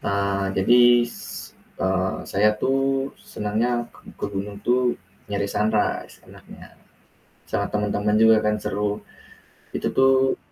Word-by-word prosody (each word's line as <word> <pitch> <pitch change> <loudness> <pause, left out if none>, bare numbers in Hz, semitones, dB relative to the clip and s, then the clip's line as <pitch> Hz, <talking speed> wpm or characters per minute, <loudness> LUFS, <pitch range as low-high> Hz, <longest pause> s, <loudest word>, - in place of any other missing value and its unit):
Nah, 100 -1 -1
jadi, 120 +4 +5
s 120 - -9 0.3
eee, 95 0 0
saya 105 +2 +3
tuh 135 +1 +1 0.5
senangnya 105 +3 -1 0.2
ke - - -19 0.2
ke - - -4
gunung 100 +1 -4
itu 125 0 +2 0.3
nyari 100 0 -1
sunrise, 105 0 0
enaknya. - - -14 0.9
Sama - - 0
temen-temen 105 0 0
juga 110 0 +7
kan 105 - +2
seru. 105 +1 -2 0.7
Itu - - -3
tuh 130 0 +4
105 Hz, 120 wpm, -23 LUFS, 100-120 Hz, 0.9 s, juga